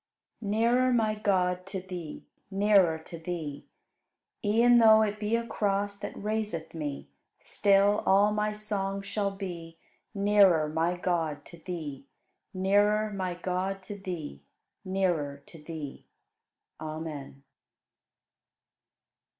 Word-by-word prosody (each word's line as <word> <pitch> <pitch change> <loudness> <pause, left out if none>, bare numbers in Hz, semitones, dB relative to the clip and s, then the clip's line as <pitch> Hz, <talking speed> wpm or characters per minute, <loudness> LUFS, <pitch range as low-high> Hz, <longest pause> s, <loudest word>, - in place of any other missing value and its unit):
72. 205 - -5
Nearer, 245 +3 +3
my 220 -3 +2
God, 185 -4 +1
to 195 -1 -4
Thee, 180 -4 -8 0.2
Nearer 195 -4 +4
to 160 +1 -10
Thee! 160 -4 -5 0.8
E'en 235 +3 +5
though 220 -1 +7
it 210 0 -2
be 215 +2 0
a 235 0 -1
cross 200 -2 -1
That 205 - -6
raiseth 210 -6 -3
me; 145 - -5 0.3
Still 200 +1 +3
all 200 +2 +5
my 210 0 0
song 200 -2 -3
shall 200 0 -1
be, 175 -4 -7 0.4
Nearer, 200 -6 +4
my 165 +3 0
God, 165 -5 -1
to 170 - -12
Thee, 155 -6 -6 0.4
Nearer, 205 +3 +2
my 185 -2 -2
God, 185 +2 -3
to 205 +2 -7
Thee, 175 - -6 0.4
Nearer 170 -7 -1
to 160 -3 -12
Thee. 155 -3 -7 0.7
Amen. 155 -3 -7
190 Hz, 120 wpm, -29 LUFS, 165-210 Hz, 0.8 s, though